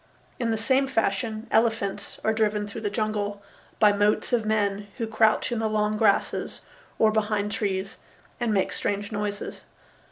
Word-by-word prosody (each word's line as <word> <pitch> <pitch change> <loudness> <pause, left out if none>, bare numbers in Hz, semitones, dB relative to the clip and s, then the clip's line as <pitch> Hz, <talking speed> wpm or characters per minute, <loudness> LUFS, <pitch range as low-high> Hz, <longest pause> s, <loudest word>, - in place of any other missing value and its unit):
In 235 -2 0
the 225 - +1
same 260 +5 +2
fashion 220 -2 -1
elephants 220 -3 0
are 220 - +2
driven 210 -1 +1
through 205 +2 -7
the 210 - -1
jungle 205 -1 -2 0.3
by 210 -2 +5
motes 205 +4 +1
of 225 -3 +2
men 205 -1 0
who 230 - -1
crouch 220 +1 +2
in 235 - -1
the 220 -1 0
long 215 0 +1
grasses 210 -2 +1 0.4
or 220 -1 +4
behind 210 -1 0
trees 195 -3 -2 0.4
and 240 -2 0
make 195 -3 +1
strange 205 +1 -2
noises. 205 -1 -4
215 Hz, 160 wpm, -26 LUFS, 205-220 Hz, 0.4 s, by